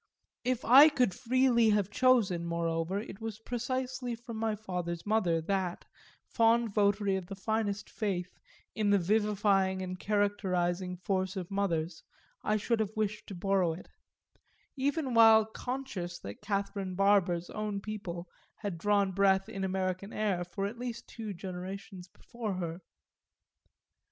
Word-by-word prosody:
If 250 Hz, 0 st, -1 dB
I 275 Hz, +6 st, +9 dB
could 250 Hz, -9 st, +1 dB
freely 245 Hz, 0 st, +3 dB
have 205 Hz, -2 st, +2 dB
chosen 235 Hz, -9 st, +3 dB
moreover 170 Hz, +2 st, -1 dB
it 210 Hz, 0 st, -8 dB
was 225 Hz, -2 st, -4 dB
precisely 250 Hz, +2 st, -3 dB
from 235 Hz, -1 st, -8 dB
my 220 Hz, -1 st, 0 dB
father's 180 Hz, -5 st, -4 dB
mother 200 Hz, -6 st, +2 dB
that, 185 Hz, 0 st, -2 dB, 0.4 s
fond 230 Hz, -1 st, +2 dB
votary 200 Hz, -1 st, +2 dB
of 185 Hz, -2 st, -6 dB
the 195 Hz, -, -6 dB
finest 210 Hz, 0 st, -2 dB
faith 185 Hz, -5 st, -3 dB, 0.3 s
in 215 Hz, -2 st, 0 dB
the 205 Hz, -, +5 dB
vivifying 195 Hz, -1 st, +2 dB
and 185 Hz, 0 st, -5 dB
characterising 185 Hz, -3 st, 0 dB
force 190 Hz, +1 st, -1 dB
of 185 Hz, -1 st, -5 dB
mothers, 170 Hz, -4 st, -1 dB, 0.4 s
I 215 Hz, -, +2 dB
should 230 Hz, +2 st, 0 dB
have 215 Hz, -1 st, -2 dB
wished 215 Hz, -1 st, -2 dB
to 195 Hz, -, -7 dB
borrow 185 Hz, -2 st, +1 dB
it; 170 Hz, -, -11 dB, 0.9 s
even 280 Hz, 0 st, -1 dB
while 225 Hz, -1 st, +7 dB
conscious 220 Hz, -7 st, -5 dB
that 100 Hz, +1 st, -8 dB
Catherine 200 Hz, -2 st, -2 dB
Barber's 185 Hz, -3 st, +2 dB
own 210 Hz, -2 st, -3 dB
people 195 Hz, -4 st, -6 dB, 0.3 s
had 200 Hz, -6 st, -5 dB
drawn 200 Hz, 0 st, +2 dB
breath 195 Hz, 0 st, +3 dB
in 195 Hz, -3 st, -5 dB
American 190 Hz, +1 st, -2 dB
air 200 Hz, -5 st, 0 dB
for 185 Hz, +3 st, -4 dB
at 220 Hz, +4 st, -5 dB
least 245 Hz, -2 st, -5 dB
two 220 Hz, -3 st, -6 dB
generations 185 Hz, 0 st, -7 dB
before 225 Hz, +2 st, -6 dB
her. 170 Hz, -1 st, -4 dB
200 Hz, 140 wpm, -31 LUFS, 185-220 Hz, 0.9 s, I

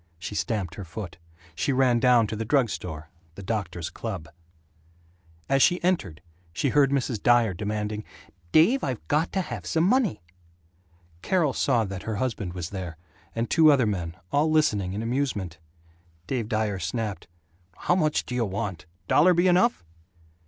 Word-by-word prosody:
She 90 Hz, -, -6 dB
stamped 100 Hz, -5 st, -2 dB
her 100 Hz, -, -7 dB
foot. 90 Hz, -1 st, -8 dB, 0.3 s
She 110 Hz, -, -1 dB
ran 130 Hz, -2 st, +3 dB
down 120 Hz, -1 st, +5 dB
to 110 Hz, -, -4 dB
the 110 Hz, -, -3 dB
drug 120 Hz, -1 st, +2 dB
store 80 Hz, -2 st, -6 dB, 0.2 s
the 100 Hz, -, -9 dB
doctor's 90 Hz, -5 st, -3 dB
club. 80 Hz, -, -5 dB, 1.2 s
As 135 Hz, 0 st, +2 dB
she 175 Hz, +5 st, +4 dB
entered 95 Hz, -, -1 dB, 0.3 s
she 140 Hz, -, 0 dB
heard 140 Hz, +1 st, +4 dB
Mrs. 130 Hz, -6 st, -1 dB
Dyer 120 Hz, -4 st, +4 dB
demanding, 105 Hz, +2 st, -3 dB, 0.5 s
"Dave, 210 Hz, -, +4 dB
I've 120 Hz, -, -3 dB
got 155 Hz, +3 st, +1 dB
to 190 Hz, -, +1 dB
have 120 Hz, -, -6 dB
some 160 Hz, -, +1 dB
money." 200 Hz, -, +2 dB, 1.0 s
Carol 165 Hz, -, +1 dB
saw 120 Hz, -5 st, +2 dB
that 95 Hz, -1 st, -6 dB
her 110 Hz, -, -4 dB
husband 105 Hz, -5 st, -2 dB
was 90 Hz, -2 st, -5 dB
there, 90 Hz, -5 st, -6 dB, 0.4 s
and 115 Hz, +1 st, -1 dB
two 160 Hz, -2 st, +6 dB
other 135 Hz, -4 st, +3 dB
men, 90 Hz, -5 st, -3 dB
all 150 Hz, +2 st, +2 dB
listening 105 Hz, -12 st, +2 dB
in 105 Hz, +3 st, -3 dB
amusement. 115 Hz, -, -2 dB, 0.7 s
Dave 115 Hz, 0 st, -3 dB
Dyer 110 Hz, -4 st, -1 dB
snapped, 100 Hz, +4 st, -3 dB, 0.5 s
"How -, -, +1 dB
much 155 Hz, -4 st, +1 dB
do -, -, -6 dB
you 125 Hz, -2 st, +1 dB
want? 95 Hz, -5 st, -4 dB, 0.2 s
Dollar 175 Hz, +4 st, +5 dB
be 175 Hz, +2 st, +3 dB
enough?" 185 Hz, -, +3 dB
115 Hz, 160 wpm, -26 LUFS, 95-140 Hz, 1.2 s, two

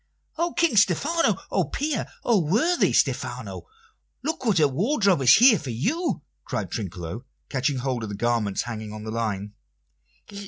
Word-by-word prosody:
"O 340 Hz, 0 st, 0 dB
King 330 Hz, -10 st, +2 dB
Stephano! 290 Hz, -, +3 dB
O -, -, +1 dB
peer! 295 Hz, -1 st, -2 dB, 0.2 s
O 230 Hz, -4 st, +3 dB
worthy 225 Hz, -, +2 dB
Stephano! -, -, -1 dB, 0.6 s
Look 315 Hz, -1 st, -3 dB
what 215 Hz, -8 st, +2 dB
a 150 Hz, -, +5 dB
wardrobe 195 Hz, -, +1 dB
is 130 Hz, -1 st, +7 dB
here 235 Hz, -3 st, +6 dB
for 145 Hz, -, -7 dB
you!" 250 Hz, -, -1 dB, 0.2 s
cried -, -, -4 dB
Trinculo, 95 Hz, +1 st, -5 dB, 0.3 s
catching 135 Hz, 0 st, 0 dB
hold 125 Hz, -1 st, -2 dB
of 110 Hz, -, -5 dB
the 100 Hz, -, -5 dB
garments 115 Hz, -3 st, 0 dB
hanging 110 Hz, -3 st, -6 dB
on 105 Hz, 0 st, -8 dB
the 110 Hz, -, -5 dB
line. 105 Hz, -3 st, -3 dB
140 Hz, 155 wpm, -25 LUFS, -, 0.6 s, is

